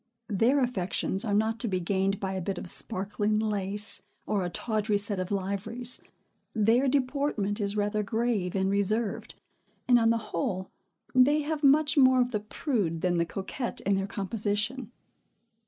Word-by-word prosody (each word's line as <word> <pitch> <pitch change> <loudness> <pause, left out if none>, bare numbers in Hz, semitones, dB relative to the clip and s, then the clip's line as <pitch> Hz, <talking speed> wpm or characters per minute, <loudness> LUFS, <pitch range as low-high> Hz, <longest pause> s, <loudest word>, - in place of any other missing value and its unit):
Their 230 +7 +3
affections 195 -4 -1
are 210 - -1
not 220 +2 +1
to 240 - 0
be 185 -3 0
gained 195 +2 0
by 190 -1 -3
a 190 - -3
bit 190 +1 -3
of - - -6
sparkling 205 +2 0
lace, 205 -1 +1 0.2
or 205 -3 0
a 175 - -2
tawdry 215 +2 -1
set 205 -1 -1
of 185 0 -3
liveries. 205 +5 -1 0.5
Their 225 +5 +3
deportment 255 -6 0
is 200 +1 -2
rather 210 +1 0
grave 215 -3 -1
and 190 0 +1
reserved; 205 +2 -1 0.5
and, 245 -1 +6
on 225 0 +3
the 230 - +3
whole, 185 +2 -2 0.4
they 285 +4 +4
have 305 0 -3
much 290 +1 +4
more 260 -1 +6
of 245 0 +1
the 210 - 0
prude 205 - -2
than 180 -1 +1
the 170 - +2
coquette 200 +8 -4
in 200 0 +1
their 195 0 -1
composition. 210 +4 -2
210 Hz, 165 wpm, -28 LUFS, 195-240 Hz, 0.5 s, and